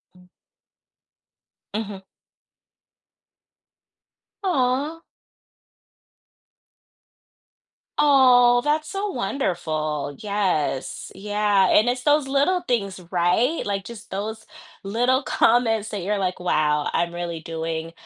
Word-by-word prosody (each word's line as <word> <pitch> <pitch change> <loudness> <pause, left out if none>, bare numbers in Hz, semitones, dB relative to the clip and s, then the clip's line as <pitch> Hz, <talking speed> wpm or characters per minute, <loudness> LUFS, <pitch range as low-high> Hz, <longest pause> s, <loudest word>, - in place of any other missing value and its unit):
M 180 0 -21 1.4
Mhm. 205 -2 -4 2.4
Aw. 290 -2 0 3.0
Aw, 250 -4 +5
that's 300 +2 0
so 395 +4 -3
wonderful. 155 - -2
Yes, 190 -10 -2
yeah, 205 0 +1
and 220 +3 +4
it's 250 0 -2
those 295 -1 +3
little 290 +7 +2
things, 205 - -2
right? 185 - +1
Like 200 -1 -2
just 230 +1 -11
those 220 +2 -5 0.4
little 245 +6 +1
comments 225 -3 +2
that 205 -4 -4
you're 205 +3 0
like, 185 -2 -2
wow, 150 -4 +1
I'm 170 0 0
really 170 -1 -4
doing 165 0 -4
210 Hz, 90 wpm, -23 LUFS, 180-255 Hz, 3.0 s, Aw